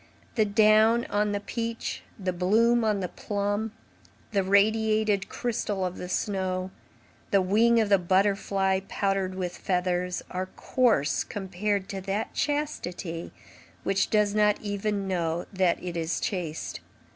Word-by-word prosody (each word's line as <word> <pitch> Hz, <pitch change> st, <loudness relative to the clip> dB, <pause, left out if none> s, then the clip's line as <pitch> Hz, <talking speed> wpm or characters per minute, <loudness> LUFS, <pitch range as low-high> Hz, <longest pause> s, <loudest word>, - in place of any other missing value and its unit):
The 220 Hz, -, +3 dB
down 215 Hz, +2 st, +4 dB
on 210 Hz, 0 st, +1 dB
the 205 Hz, -, -1 dB
peach, 230 Hz, +2 st, -4 dB, 0.2 s
the 185 Hz, -3 st, -2 dB
bloom 225 Hz, +7 st, +3 dB
on 210 Hz, -3 st, +1 dB
the 180 Hz, -, -1 dB
plum, 205 Hz, +3 st, -2 dB, 0.6 s
the 200 Hz, -2 st, +2 dB
radiated 215 Hz, +1 st, +2 dB
crystal 210 Hz, -5 st, -2 dB
of 180 Hz, 0 st, -4 dB
the 180 Hz, -, -6 dB
snow, 185 Hz, -1 st, -1 dB, 0.6 s
the 200 Hz, -, +4 dB
wing 225 Hz, +5 st, +4 dB
of 220 Hz, -2 st, +1 dB
the 200 Hz, -2 st, +5 dB
butterfly 190 Hz, +1 st, +2 dB
powdered 195 Hz, -2 st, -1 dB
with 180 Hz, -1 st, -3 dB
feathers, 180 Hz, -1 st, -1 dB
are 185 Hz, +1 st, -3 dB
coarse 220 Hz, -, +2 dB
compared 195 Hz, 0 st, -2 dB
to 195 Hz, -3 st, -4 dB
that 195 Hz, +3 st, -3 dB
chastity 195 Hz, -, -3 dB, 0.5 s
which 195 Hz, 0 st, +1 dB
does 210 Hz, -1 st, +2 dB
not 210 Hz, -1 st, +3 dB
even 205 Hz, -1 st, -2 dB
know 170 Hz, -2 st, -1 dB
that 185 Hz, -2 st, +2 dB
it 175 Hz, -1 st, -4 dB
is 165 Hz, 0 st, -1 dB
chaste. 170 Hz, -6 st, -3 dB
200 Hz, 135 wpm, -27 LUFS, 185-215 Hz, 0.6 s, the